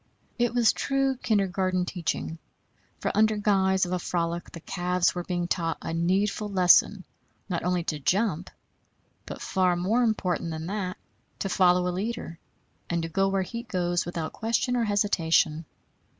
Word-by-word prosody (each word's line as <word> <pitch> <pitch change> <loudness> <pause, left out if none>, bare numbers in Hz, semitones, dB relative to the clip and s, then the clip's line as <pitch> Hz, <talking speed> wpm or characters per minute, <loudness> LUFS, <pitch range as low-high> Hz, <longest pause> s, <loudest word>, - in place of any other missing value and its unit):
It 240 0 +1
was 235 -2 +4
true 270 -1 0
kindergarten 190 -5 0
teaching; 165 -2 -3 0.6
for - - -1
under 215 0 +3
guise 190 -2 +2
of 175 - -6
a 180 - 0
frolic 170 -1 -2
the 170 - -8
calves 180 +1 0
were 175 - -4
being 175 -1 -2
taught 165 -2 -1
a - - -5
needful 195 +5 0
lesson, 185 +1 +4 0.4
not 175 -4 -2
only 180 0 0
to 155 -3 -3
jump, 185 +2 0 0.8
but, - - -7
far 185 -2 +2
more 195 +8 +1
important 185 -8 0
than 160 0 -5
that, 185 -1 -3 0.4
to 195 - -3
follow 180 -1 +3
a 180 - -1
leader, 190 -3 -4 0.5
and 170 -1 -1
to 165 - -4
go 195 +4 +1
where 195 -1 0
he 230 +5 -6
goes 175 -6 -1
without 170 -2 -4
question 235 +2 0
or 235 -2 +1
hesitation. 170 -6 +2
185 Hz, 160 wpm, -27 LUFS, 175-205 Hz, 0.8 s, was